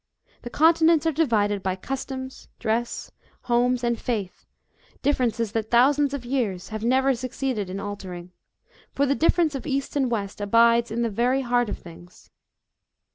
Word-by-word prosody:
The 240 - -7
continents 325 +2 +4
are 325 - +3
divided 215 -10 +1
by 185 -1 -1
customs, 260 +4 -6
dress, 235 +1 -2 0.3
homes, 245 +1 +1
and 235 -1 0
faith 210 -7 -4 0.6
differences 240 -6 0
that 220 0 -2
thousands 275 +4 +4
of 255 -3 -7
years 230 -9 -2
have 220 0 -5
never 265 +3 +3
suc 255 +1 -5
ceeded 240 -8 -3
in 190 +2 -5
altering; 185 -3 -7 0.6
for 280 - +2
the 280 - +2
difference 325 +1 +2
of 275 +2 -5
East 275 0 -2
and 270 -3 +1
West 205 -3 -3
abides 230 +3 +4
in 235 +2 -1
the 230 - -1
very 245 +5 +1
heart 245 -2 +1
of - - -4
things. 175 +1 -15
240 Hz, 160 wpm, -24 LUFS, 210-270 Hz, 0.6 s, continents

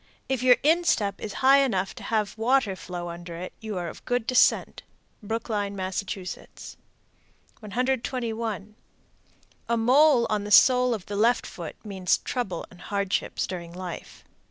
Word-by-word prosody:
If 265 -2 -1
your 250 -1 +6
instep 300 - +2
is 215 - -4
high 275 +1 +8
enough 195 -7 -1
to - - -11
have 215 -3 -1
water 225 -2 +2
flow 175 -1 -6
under 170 0 -8
it, 180 +2 -7
you 215 -4 -5
are 175 -1 -3
of - - -9
good 245 -2 0
descent. 250 +1 +3 0.4
Brookline, 210 -2 -3
Mass. 190 0 -2
121. 220 +3 -5 0.9
A 235 - +2
mole 255 +2 +5
on 210 -2 -1
the 205 - -6
sole 250 +3 +6
of 195 -4 -9
the 205 - -5
left 230 +4 +2
foot 170 -4 -8
means 190 -3 +1
trouble 195 -9 -4
and 180 - -15
hardships 200 -1 -1
during 170 -2 -7
life. 180 -1 -8
215 Hz, 145 wpm, -26 LUFS, 185-245 Hz, 0.9 s, high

